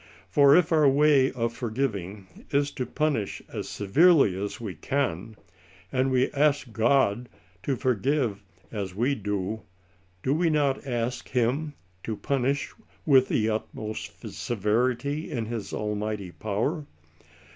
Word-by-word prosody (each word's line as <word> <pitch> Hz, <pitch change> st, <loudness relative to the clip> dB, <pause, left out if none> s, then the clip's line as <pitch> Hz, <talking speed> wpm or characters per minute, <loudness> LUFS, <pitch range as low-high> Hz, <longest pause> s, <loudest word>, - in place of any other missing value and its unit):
For 140 Hz, -1 st, +6 dB
if 175 Hz, -2 st, +3 dB
our 155 Hz, -3 st, +5 dB
way 140 Hz, -1 st, +4 dB
of 115 Hz, -2 st, -1 dB
forgiving 110 Hz, -5 st, -3 dB, 0.2 s
is 145 Hz, -1 st, +1 dB
to 125 Hz, -, -4 dB
punish 145 Hz, -9 st, -1 dB
as -, -, -4 dB
severely 135 Hz, -, +4 dB
as 100 Hz, -, -5 dB
we 110 Hz, -5 st, -5 dB
can, 110 Hz, -, -2 dB, 0.6 s
and 130 Hz, 0 st, +1 dB
we 130 Hz, 0 st, +2 dB
ask 140 Hz, -3 st, +1 dB
God 120 Hz, -1 st, +2 dB, 0.3 s
to 135 Hz, +5 st, -1 dB
forgive 125 Hz, -3 st, 0 dB, 0.3 s
cw 100 Hz, -4 st, -4 dB
we 125 Hz, +7 st, +1 dB
do, 105 Hz, -1 st, -3 dB, 0.6 s
do 135 Hz, -, +2 dB
we 165 Hz, +2 st, +2 dB
not 140 Hz, -3 st, +1 dB
ask 120 Hz, 0 st, -2 dB
him 135 Hz, +5 st, 0 dB, 0.3 s
to 110 Hz, +1 st, -4 dB
punish 140 Hz, +3 st, -1 dB, 0.3 s
with 135 Hz, -4 st, +5 dB
the 110 Hz, -, +1 dB
utmost 110 Hz, 0 st, -5 dB
severity 125 Hz, -, -1 dB
in 115 Hz, -4 st, -2 dB
his 110 Hz, -3 st, -5 dB
Almighty 105 Hz, -2 st, -3 dB
power 110 Hz, -, -2 dB
125 Hz, 130 wpm, -26 LUFS, 105-140 Hz, 0.6 s, For